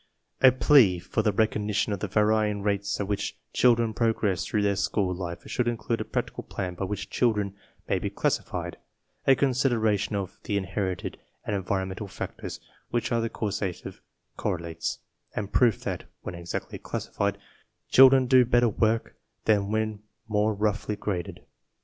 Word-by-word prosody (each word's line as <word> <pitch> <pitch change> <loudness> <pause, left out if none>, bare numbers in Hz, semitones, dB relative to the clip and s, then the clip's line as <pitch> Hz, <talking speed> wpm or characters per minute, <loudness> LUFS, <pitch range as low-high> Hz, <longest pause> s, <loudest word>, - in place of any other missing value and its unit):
A 130 - +9
plea 125 - +5
for 90 +5 -1
the 105 -1 +2
recognition 105 0 +1
of 100 - -3
the 105 - -2
varying 105 0 +2
rates 100 0 0
at 100 - -2
which 100 -1 -2 0.2
children 115 -2 +4
progress 110 -5 +1
through 105 -2 0
their 100 -1 +2
school 95 -1 0
life 85 -1 -5
should 125 - -1
include 115 0 -1
a - - -3
practical - - -3
plan 90 -2 -4
by 95 +2 -3
which 105 +1 -5
children 105 -5 +1 0.3
may - - +1
be - - -2
classified, - - -2 0.5
a 135 - +7
consideration 120 -6 +1
of 100 -3 -4
the 100 - 0
inherited 95 -1 -3 0.3
and 105 - -1
environ 95 0 -1
mental 95 +2 -6
factors - - -6 0.3
which 120 0 -1
are 115 -1 +2
the 115 - -1
causative 100 -5 -4 0.4
correlates, 85 -2 -2 0.4
and 100 -2 -4
proof 120 -5 +4
that, - - -4 0.2
when - - -5
exactly 85 0 -5
classified, 100 0 -2 0.5
children 130 0 +7
d6 125 -2 +5
better 120 -1 +4
work 110 +2 0 0.3
than 100 -2 +3
when 110 -1 -1 0.3
more 105 0 +1
roughly 105 0 0
graded. 95 -4 -4
105 Hz, 155 wpm, -27 LUFS, 100-115 Hz, 0.5 s, A